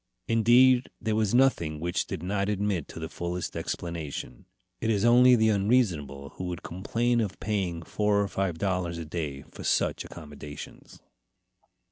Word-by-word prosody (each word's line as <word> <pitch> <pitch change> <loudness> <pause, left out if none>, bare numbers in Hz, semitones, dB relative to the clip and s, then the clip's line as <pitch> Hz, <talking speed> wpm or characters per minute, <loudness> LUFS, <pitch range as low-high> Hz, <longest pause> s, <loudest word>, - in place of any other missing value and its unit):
Indeed, 120 +3 +5
there 110 -1 -1
was 110 0 +1
nothing 85 - +2
which 85 +2 -1
did 80 - -5
not 100 +2 -1
admit 100 -5 -1
of - - -7
the - - -3
fullest 85 +1 -4
explanation. 80 -7 -5 0.3
It 115 - -1
is 105 -1 +2
only 125 +1 +7
the 110 -1 +3
unreasonable 95 - +1
who 90 - -4
would 90 -1 -5
complain 115 +6 0
of 100 -3 -4
paying 95 -6 -2
four 105 +3 +1
or 100 - +1
five 95 -4 -2
dollars 90 -2 -1
a 85 - -5
day 75 -4 -4
for - - -9
such - - +1
accommodations. 75 -2 -10
95 Hz, 155 wpm, -28 LUFS, 85-110 Hz, 0.3 s, only